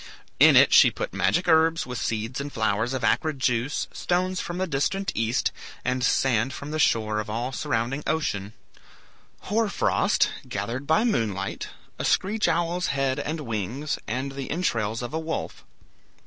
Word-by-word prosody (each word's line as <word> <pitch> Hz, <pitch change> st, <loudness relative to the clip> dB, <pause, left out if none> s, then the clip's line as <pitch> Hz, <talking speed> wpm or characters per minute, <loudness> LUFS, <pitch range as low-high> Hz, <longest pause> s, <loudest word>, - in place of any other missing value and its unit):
In -, -, +8 dB
it -, -, +6 dB
she -, -, +8 dB
put -, -, -5 dB
magic 175 Hz, +1 st, +1 dB
herbs, 160 Hz, 0 st, +4 dB
with 125 Hz, -1 st, -5 dB
seeds 115 Hz, +4 st, -2 dB
and 145 Hz, +1 st, -6 dB
flowers 110 Hz, +2 st, 0 dB
of 130 Hz, -, -4 dB
acrid 155 Hz, +5 st, +1 dB
juice, 125 Hz, +1 st, 0 dB
stones 185 Hz, +1 st, 0 dB
from 175 Hz, -, -5 dB
the 185 Hz, -, 0 dB
distant 190 Hz, +6 st, -1 dB
east, 115 Hz, +2 st, 0 dB, 0.3 s
and 130 Hz, 0 st, 0 dB
sand 130 Hz, -1 st, +2 dB
from 145 Hz, +1 st, -7 dB
the 155 Hz, -, -2 dB
shore 110 Hz, -6 st, +2 dB
of 105 Hz, +1 st, -5 dB
all 120 Hz, +4 st, -2 dB
surrounding 125 Hz, +3 st, -2 dB
ocean; 110 Hz, -10 st, -1 dB, 0.9 s
hoar 220 Hz, +2 st, 0 dB
frost, -, -, +2 dB, 0.2 s
gathered 115 Hz, +7 st, -4 dB
by 160 Hz, +8 st, +3 dB
moonlight, 105 Hz, -, -1 dB, 0.3 s
a -, -, -2 dB
screech 210 Hz, +3 st, +1 dB
owl's 175 Hz, +2 st, 0 dB
head 135 Hz, -1 st, 0 dB
and 155 Hz, +1 st, -3 dB
wings, 120 Hz, +4 st, -3 dB
and 130 Hz, +5 st, -2 dB
the 135 Hz, -1 st, -6 dB
entrails 115 Hz, -, -1 dB
of 120 Hz, -, -6 dB
a 160 Hz, -, -1 dB
wolf. 160 Hz, 0 st, -4 dB
135 Hz, 160 wpm, -25 LUFS, 115-160 Hz, 0.9 s, In